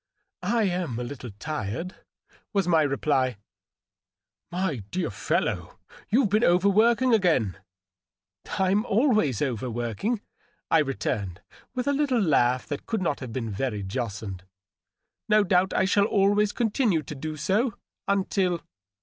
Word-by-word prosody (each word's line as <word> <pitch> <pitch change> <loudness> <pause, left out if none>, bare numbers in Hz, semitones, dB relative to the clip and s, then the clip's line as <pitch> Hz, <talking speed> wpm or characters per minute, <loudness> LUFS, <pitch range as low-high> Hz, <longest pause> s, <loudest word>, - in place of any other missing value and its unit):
" - - -66 0.2
I 225 - +3
am 175 - -1
a 125 - -3
little 125 0 -7
tired,'' 155 - -4 0.6
was 195 -3 +1
my 165 -3 +4
reply. 135 -4 +1 0.6
" - - -60
My 175 -5 -1
dear 185 0 -2
fellow, - - -2 0.3
you've 225 -2 +3
been 215 +3 +3
overworking 215 +8 +4
again." 160 - +2 0.9
'^Fm 190 +2 +1
always 215 - +2
overworking," 120 - -2 0.5
I 165 - +6
returned, 105 - -2 0.3
with 250 - -1
a 285 - +3
little 275 -4 +1
laugh 130 - +2
that 145 -1 -6
could 220 -5 -1
not 145 - 0
have* 130 -3 -7
been 115 -2 -3
very 105 -1 -2
jocund. 100 -3 -4 0.4
" - - -57
No 215 -1 +5
doubt 185 -1 +2
I 190 - +2
shall 200 +1 +3
always 205 0 +3
continue 220 - +1
to - - -7
do 155 +2 -5
so, 210 - +1 0.3
until 190 -3 +1
175 Hz, 140 wpm, -26 LUFS, 130-205 Hz, 0.9 s, I